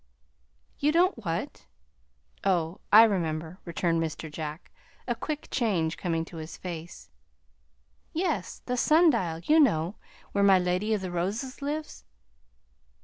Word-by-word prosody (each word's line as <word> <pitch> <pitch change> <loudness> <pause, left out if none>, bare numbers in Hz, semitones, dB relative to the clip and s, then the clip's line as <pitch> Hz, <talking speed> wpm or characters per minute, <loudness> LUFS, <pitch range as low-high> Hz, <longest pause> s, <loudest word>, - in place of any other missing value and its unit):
"You 295 - +3
don't 345 - +2
what? 165 +1 -4 0.8
oh, 175 -2 0
I 220 +2 +10
remember," 170 -4 -1
returned 170 -1 0
Mr. 160 -1 -4
Jack, 155 +1 -6 0.4
a 240 - +1
quick 300 +6 -5
change 185 - 0
coming 165 -2 -2
to 165 - -11
his 160 +1 -7
face. 170 - -8 1.0
"Yes, 315 - -2
the 250 0 -1
sundial, 240 - +3
you 310 +2 +5
know, 190 - +2 0.3
where 200 - +1
my 195 -1 +7
Lady 185 +4 +1
of 205 - -3
the 185 -1 -4
Roses 210 +11 -3
lives." 300 +2 -4
185 Hz, 130 wpm, -28 LUFS, 165-250 Hz, 1.0 s, I